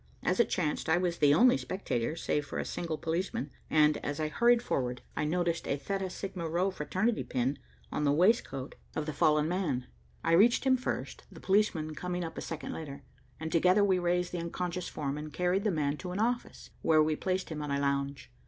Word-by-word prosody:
As - - +1
it 235 - +4
chanced, 160 -3 -1
I 160 - +5
was 175 -1 -1
the 145 -1 +5
only 250 +8 +6
spectator, 155 - -2
save 150 -2 -1
for - - -5
a - - -2
single 165 -2 -3
policeman, 165 -4 -2 0.2
and, 150 -1 +4
as 145 +2 -4
I 155 -1 0
hurried 235 +7 +4
forward, 125 -2 -2
I - - 0
noticed 170 +1 0
a 140 - 0
Theta 190 +6 -3
Sigma 180 -3 -5
Rho 180 +4 +1
fraternity 190 +7 -1
pin 130 +3 -1 0.3
on - - -1
the 145 - +3
waistcoat 150 - +2 0.2
of 155 - -1
the 155 - -3
fallen 150 +1 +3
man. 165 -8 -1 0.4
I - - +1
reached 210 +8 +5
him 265 -1 +4
first, 255 - -4
the - - -11
policeman 190 -6 +1
coming 180 +2 -3
up 165 - -6
a - - -5
second 160 -2 -5
later, 140 -3 -7 0.4
and 160 0 -4
together 180 +4 +4
we 190 -2 +3
raised 175 0 0
the 180 - -3
unconscious 175 +1 -3
form 145 -1 -3
and 155 0 -7
carried 180 +5 +1
the - - +4
man 150 -3 0
to 180 +2 -6
an 185 - -3
office, 240 +2 -2
where 155 -1 +5
we 155 0 +1
placed 185 +3 -2
him 155 -2 -4
on 150 - -4
a 140 0 0
lounge. 140 -1 -1
165 Hz, 210 wpm, -31 LUFS, 150-185 Hz, 0.4 s, only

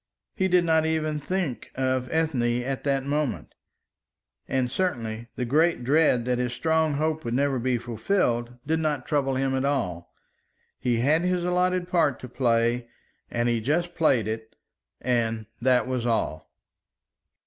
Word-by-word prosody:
He 190 - +1
did 180 -1 +3
not 160 -1 +3
even 155 -1 0
think 170 -4 -3
of 130 -1 0
Ethne 125 -7 +1
at 135 +1 -3
that 135 -1 +1
moment; 145 -1 -2 0.9
and 130 -2 0
certainly 120 -10 -2
the 125 - -2
great 155 +2 +2
dread 135 -3 +3
that 125 -1 0
his 125 -1 -1
strong 160 +4 +1
hope 155 +1 -1
would 120 0 -2
never 135 -1 +1
be 125 +1 +1
fulfilled 120 - -1
did 160 +2 +1
not 150 -5 -1
trouble 135 -3 0
him 135 0 0
at 130 0 0
all. 110 -12 -1 0.7
He 120 -2 +1
had 150 +6 +3
his 180 0 0
allotted 180 0 +1
part 170 -7 +2
to 125 - -7
play, 120 -1 +1 0.4
and 120 0 0
he 120 -1 +1
just 170 +8 0
played 135 - +2
it; 110 0 -5 0.5
and 115 -3 0 0.2
that 125 0 +3
was 125 -2 -2
all. 110 -9 -1
130 Hz, 155 wpm, -26 LUFS, 120-160 Hz, 0.9 s, did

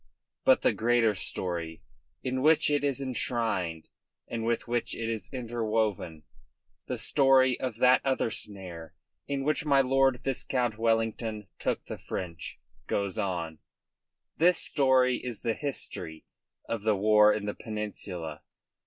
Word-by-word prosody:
But - - +5
the - - +4
greater 115 -1 +3
story 85 -4 -4 0.4
in 130 0 -1
which 155 +1 +4
it 145 -1 +1
is 140 -1 0
enshrined 115 -10 -2 0.4
and 115 -1 -4
with 115 +1 -1
which 120 0 -1
it 115 - -3
is 110 -3 -4
interwoven, 110 - -2 0.6
the - - -2
story 130 -2 +4
of 125 -4 -3
that 125 +1 +5
other 130 -4 +1
snare 90 -7 -7 0.3
in 140 -1 -2
which 150 +1 +1
my 140 -2 +4
Lord 135 -1 +3
Viscount 125 -4 -1
Wellington 115 -2 0
took - - -1
the - - -7
French, 85 -3 -6 0.3
goes 100 0 -1
on. 85 -6 -2 0.8
This 175 +2 +5
story 130 -3 +3
is 120 -4 -7
the 115 - +1
history 110 - -5 0.4
of 115 -3 -2
the 110 0 +2
war 105 +1 +6
in 105 - -1
the 105 - -2
Peninsula. 100 -7 -5
115 Hz, 135 wpm, -29 LUFS, 100-130 Hz, 0.8 s, war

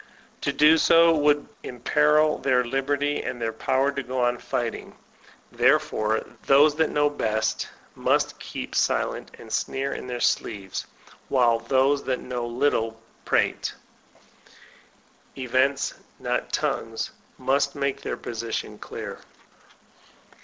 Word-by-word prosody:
To 140 - 0
do 150 +3 +5
so 165 0 +6
would 145 -1 +2
imperil 150 +5 +2
their 125 -2 +2
liberty, 140 +3 0
and 120 - -5
their 115 -1 -2
power 135 +4 +1
to 140 0 -3
go 130 -1 -2
on 120 0 +1
fighting. 120 -1 -4 0.6
Therefore 110 +1 +2 0.2
those 145 +2 +6
that 160 -1 +2
know 145 0 +2
best 110 -6 -1 0.2
must - - 0
keep - - -7
silent, - - 0
and - - -10
sneer 135 +1 -1
in - - -6
their 125 -1 -4
sleeves, 100 -5 -1 0.4
while 120 -3 +3
those 135 +3 +2
that 130 -1 -1
know 125 -2 -4
little 120 -2 0 0.3
prate. - - 0 1.6
Events, 130 +2 +1 0.2
not - - -2
tongues, - - -2 0.3
must 140 +1 +1
make 140 -1 -1
their - - -4
position 115 -1 -5
clear. - - -7
135 Hz, 120 wpm, -25 LUFS, 120-145 Hz, 1.6 s, so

